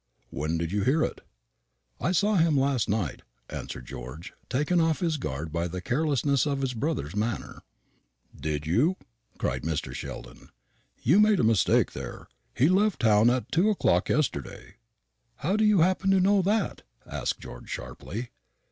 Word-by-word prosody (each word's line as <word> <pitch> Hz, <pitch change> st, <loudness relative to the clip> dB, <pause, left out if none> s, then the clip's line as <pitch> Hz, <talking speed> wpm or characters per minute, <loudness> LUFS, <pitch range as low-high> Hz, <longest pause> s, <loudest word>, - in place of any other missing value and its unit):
"When 75 Hz, +4 st, -2 dB
did 85 Hz, 0 st, -2 dB
you 100 Hz, 0 st, 0 dB
hear 150 Hz, +7 st, +3 dB
it?" -, -, -3 dB, 0.8 s
"I 170 Hz, -, 0 dB
saw 205 Hz, +3 st, +2 dB
him 160 Hz, -4 st, +3 dB
last 135 Hz, -5 st, +1 dB
night," 100 Hz, -8 st, -1 dB, 0.3 s
answered -, -, -6 dB
George, 65 Hz, +10 st, -8 dB, 0.2 s
taken 150 Hz, +6 st, +2 dB
off 160 Hz, -1 st, +1 dB
his 165 Hz, -4 st, 0 dB
guard 75 Hz, -, -4 dB
by 85 Hz, +1 st, 0 dB
the 90 Hz, +2 st, -5 dB
carelessness 140 Hz, -, +1 dB
of 140 Hz, -1 st, -1 dB
his 130 Hz, -2 st, -1 dB
brother's 120 Hz, -, -2 dB
manner. 110 Hz, +2 st, -3 dB, 0.7 s
"Did 75 Hz, -1 st, -3 dB
you?" 130 Hz, -, +2 dB, 0.4 s
cried -, -, -1 dB
Mr. 80 Hz, -1 st, -3 dB
Sheldon. -, -, -8 dB, 0.5 s
"You 165 Hz, -, +5 dB
make 210 Hz, -1 st, +5 dB
a -, -, +1 dB
mistake 110 Hz, -4 st, +3 dB
there. -, -, -8 dB, 0.3 s
He 135 Hz, -, +4 dB
left 200 Hz, +3 st, +2 dB
town 110 Hz, 0 st, +5 dB
at 125 Hz, 0 st, -1 dB
two 180 Hz, +6 st, +3 dB
o'clock 210 Hz, -, +2 dB
yesterday." 140 Hz, -8 st, -2 dB, 0.6 s
"How 170 Hz, -, -1 dB
do 215 Hz, -, +2 dB
you 210 Hz, -5 st, +5 dB
happen 185 Hz, +3 st, +2 dB
to 195 Hz, 0 st, +5 dB
know 195 Hz, +2 st, +4 dB
that?" 205 Hz, +2 st, 0 dB, 0.2 s
asked -, -, -3 dB
George -, -, -10 dB
sharply. 100 Hz, -, -6 dB
135 Hz, 160 wpm, -27 LUFS, -, 0.8 s, You